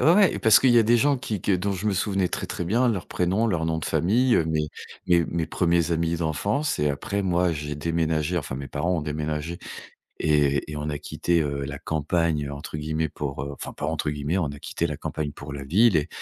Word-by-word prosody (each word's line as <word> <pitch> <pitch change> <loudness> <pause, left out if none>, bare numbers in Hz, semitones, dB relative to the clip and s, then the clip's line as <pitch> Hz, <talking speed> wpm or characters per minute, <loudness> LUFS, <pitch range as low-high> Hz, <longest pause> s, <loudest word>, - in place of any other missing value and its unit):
ouais, 185 +4 +5
parce 110 -1 +6
qu'il 130 - +5
y 120 - +6
a - - +6
des 115 +2 +4
gens 140 +4 +3
qui 110 -5 -4
que 100 - +1
dont 100 +2 -1
je 95 +2 -4
me 105 - +2
souvenais 95 -1 0
très, - - -3
très 85 - -4
bien, 120 +8 +2
leur 100 -6 -1
prénom, 95 +6 +1
leur 85 -7 0
nom 80 0 0
de - - -5
famille, 120 +8 +2
heu, 80 - +3
mes 80 -1 -1 0.4
mes 85 -2 +4
mes 85 -1 -2
1ers 85 -1 +1
amis 85 0 0
d'enfance 100 - -1
et 75 - +2
après, 100 +8 -2
moi, 90 -2 +2
j'ai 75 -1 -4
déménagé 80 +1 0
enfin, 70 -4 -5
mes 70 0 -6
parents 85 +6 -1
ont - - -3
déménagé 75 +2 -3 0.6
et 75 -1 +2
et - - -5
on 75 +1 -3
a 75 - -3
quitté, 85 +3 0
heu, 70 -1 -2
«la 70 +1 -6
campagne» 80 -1 0
entre 70 +2 -6
guillemets 80 +1 -1
pour, 70 -2 -4
heu 70 +1 -5
enfin, 70 - -7
pas - - -4
entre 80 -1 -1
guillemets, 75 +4 -1
on 85 - +1
a 70 0 -6
quitté 85 - -2
la 75 -3 -4
campagne 75 0 -4
pour 70 -1 -9
la 70 -1 -6
ville 100 - +4
et 75 - 0
80 Hz, 235 wpm, -25 LUFS, 75-95 Hz, 0.6 s, parce